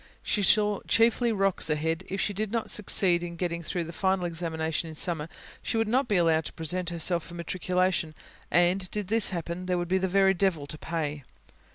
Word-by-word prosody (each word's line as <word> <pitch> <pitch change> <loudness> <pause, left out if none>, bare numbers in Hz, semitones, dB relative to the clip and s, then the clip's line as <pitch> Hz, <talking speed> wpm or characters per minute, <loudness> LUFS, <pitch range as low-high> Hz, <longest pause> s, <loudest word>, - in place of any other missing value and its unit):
She 210 - 0
saw 210 +1 +3
chiefly 230 +1 +3
rocks 195 -5 +1
ahead. 160 +2 -1
If 195 - -3
she 205 - -1
did 210 +1 -3
not 230 -1 -2
succeed 185 -4 +2
in 175 -1 -6
getting 170 -1 -3
through 170 +1 -3
the 165 +1 -8
final 190 0 0
examination 165 -1 -2
in 160 - -9
summer, 160 -1 +2 0.3
she - - -2
would 225 -1 +1
not 255 +4 +1
be 210 - +1
allowed 165 -3 +3
to - - -7
present 175 +2 -2
herself 170 0 +1
for 170 - -11
matriculation, 180 -1 -1 0.3
and, 175 +2 +2
did 210 -3 -4
this 225 -1 +4
happen, 175 +1 -5
there 180 -1 +1
would 175 0 -2
be 190 +2 +1
the 190 - 0
very 190 +1 +4
devil 175 -6 0
to 155 - -8
pay. 150 -3 -3
180 Hz, 205 wpm, -27 LUFS, 165-195 Hz, 0.3 s, this